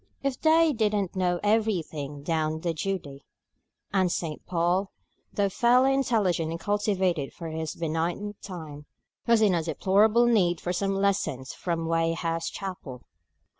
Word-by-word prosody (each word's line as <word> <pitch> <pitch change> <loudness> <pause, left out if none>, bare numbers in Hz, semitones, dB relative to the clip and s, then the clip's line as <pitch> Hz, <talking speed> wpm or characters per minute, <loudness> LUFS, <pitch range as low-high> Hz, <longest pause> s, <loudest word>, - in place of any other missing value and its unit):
"They 315 +4 +3
didn't 210 -5 0
know 180 -2 +1
everything 170 -10 -1
down 155 -1 0
in 170 -2 0
Judee;" 155 -5 -4 0.7
and 185 -3 +2
St. 160 -4 -3
Paul, 180 +3 +1 0.4
though 200 -1 +1
fairly 250 +6 +3
intelligent 210 -11 +1
and 165 +1 -4
cultivated 190 -7 0
for 165 -2 -7
his 160 0 -4
benighted 170 +5 -3
time, 155 -6 -8 0.4
was 230 -2 +5
in 205 -3 +4
a 170 - +1
deplorable 205 +8 +3
need 185 -8 +2
of 180 +1 -1
some 195 +1 0
lessons 190 -10 -1
from 165 -2 -3
Weigh 165 0 +1
house 165 0 -2
Chapel. 180 -10 -7
180 Hz, 135 wpm, -27 LUFS, 165-205 Hz, 0.7 s, was